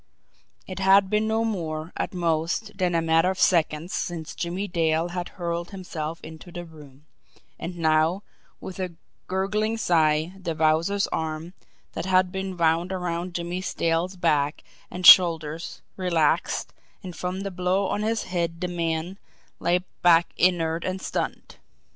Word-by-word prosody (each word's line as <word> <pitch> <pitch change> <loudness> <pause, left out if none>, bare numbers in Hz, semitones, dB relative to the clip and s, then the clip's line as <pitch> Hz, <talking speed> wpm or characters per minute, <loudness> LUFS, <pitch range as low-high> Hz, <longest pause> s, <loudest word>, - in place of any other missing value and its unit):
It 185 0 -7
had 195 0 +5
been 215 +1 +2
no 220 +1 +1
more, 165 -6 -3
at - - -2
most, 170 +4 -1
than 180 -3 0
a 165 - +2
matter 165 +2 +3
of 190 - -2
seconds 165 -1 +2
since 165 -2 -4
Jimmie 180 +3 -3
Dale 165 -1 +1
had 180 0 -4
hurled 170 -1 -3
himself 165 -5 -5
into 160 +2 -10
the 175 0 -7
room; 150 -3 -15 0.5
and 175 +1 -6
now, 160 +4 +2 0.4
with 190 - -8
a 180 -2 -4 0.3
gurgling 210 +4 0
sigh, 160 -4 +2
the 175 -4 -4
Wowzer's 160 +6 +2
arms, 160 +2 -3 0.4
that 165 - -4
had 185 -1 +3
been 190 -1 -4
wound 170 +2 +2
around 175 -1 -3
Jimmie 175 +1 -3 0.2
Dale's 170 +3 0
back 150 -4 +1 0.3
and 180 0 -5
shoulders, 165 -3 +6
relaxed, 170 -5 0 0.3
and, 180 -2 -7
from 185 +1 -3
the 195 0 -4
blow 185 +2 0
on 205 - -1
his 220 +1 0
head 170 -2 -2
the 180 - -2
man, 170 +2 -3 0.4
lay 180 +1 +2 0.2
back 170 -1 +5
inert 170 -2 +2
and 185 0 -3
stunned. - - -4
175 Hz, 150 wpm, -25 LUFS, 165-185 Hz, 0.5 s, shoulders